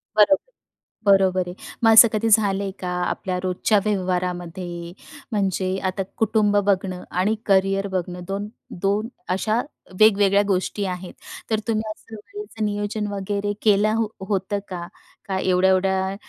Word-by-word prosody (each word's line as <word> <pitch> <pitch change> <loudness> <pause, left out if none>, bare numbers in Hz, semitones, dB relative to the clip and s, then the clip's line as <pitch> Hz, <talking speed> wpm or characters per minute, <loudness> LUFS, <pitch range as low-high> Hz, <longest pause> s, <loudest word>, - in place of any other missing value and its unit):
बरोबर, 285 - +4 0.5
बरोबर 190 -2 +3
आहे. 175 - -6 0.3
मग 225 - +7
असं 225 +1 +10
कधी 220 +1 0
झालंय 200 -2 +3
का 180 - -4 0.2
आपल्या 185 -1 -3
रोजच्या 185 +3 +1
व्यवहारामध्ये 180 -3 -3 0.4
म्हणजे 190 -2 0
आता 190 +1 -1 0.2
कुटुंब 215 -2 +2
बघणं 185 -2 0
आणि 190 +5 +1
करियर 195 0 +2
बघणं 180 -1 -3
दोन 200 +2 -3 0.3
दोन 205 +4 0 0.2
अशा 215 +5 0 0.4
वेगवेगळ्या 205 -2 +5
गोष्टी 195 +2 -1
आहेत. 180 -1 -5 0.4
तर 220 - +2
तुम्ही 220 -1 -1
असं 220 +1 -10
वेळेचं 225 - -7
नियोजन 205 +1 -2
वगैरे 200 +1 -2
केलं 210 0 +3
हो 225 -1 0 0.2
होतं 200 0 -1
का? 175 -2 -5 0.4
का 190 -1 -2
एवढ्या-एवढ्या 190 +1 +2
195 Hz, 135 wpm, -23 LUFS, 185-210 Hz, 0.5 s, असं